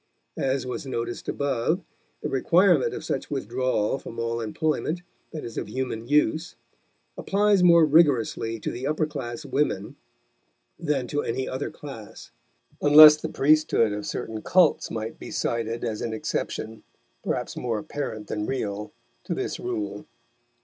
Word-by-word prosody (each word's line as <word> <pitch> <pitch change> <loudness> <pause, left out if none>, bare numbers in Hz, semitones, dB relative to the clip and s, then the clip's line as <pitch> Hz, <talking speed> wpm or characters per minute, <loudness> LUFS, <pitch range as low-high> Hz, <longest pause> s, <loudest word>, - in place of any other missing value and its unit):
As 135 -1 0
was 125 +2 -5
noticed 120 -2 -4
above, 140 +6 0 0.4
the - - 0
requirement 170 +3 +3
of - - -6
such - - -3
withdrawal 125 +1 -1
from 115 - -10
all 115 0 -2
employment 155 +8 -1 0.3
that 155 - -6
is 115 - -5
of - - -6
human 120 -1 -4
use 155 +4 +1 0.6
applies 205 -1 +3
more 170 -2 +7
rigorously 135 -7 +2
to - - -2
the 125 +3 -4
upper 155 +1 +1
class 140 -1 -6
women 135 -8 -1 0.8
than 150 -6 -1
to 145 +4 -1
any 130 +3 -2
other 130 +2 -3
class, 125 -8 -10 0.5
unless 150 +1 +10
the - - -5
priesthood 145 -7 +3
of 105 0 -5
certain 110 -1 -4
cults 175 +2 +3
might 110 0 -5
be - - -8
cited 115 0 -2
as 110 -3 -3
an 115 - -3
exception, 110 0 -4 0.4
perhaps - - -2
more 115 -3 -2
apparent 110 -2 -5
than 105 0 -3
real, 105 -5 -3 0.3
to - - -2
this - - -3
rule. 100 -1 -4
130 Hz, 145 wpm, -25 LUFS, 115-150 Hz, 0.8 s, unless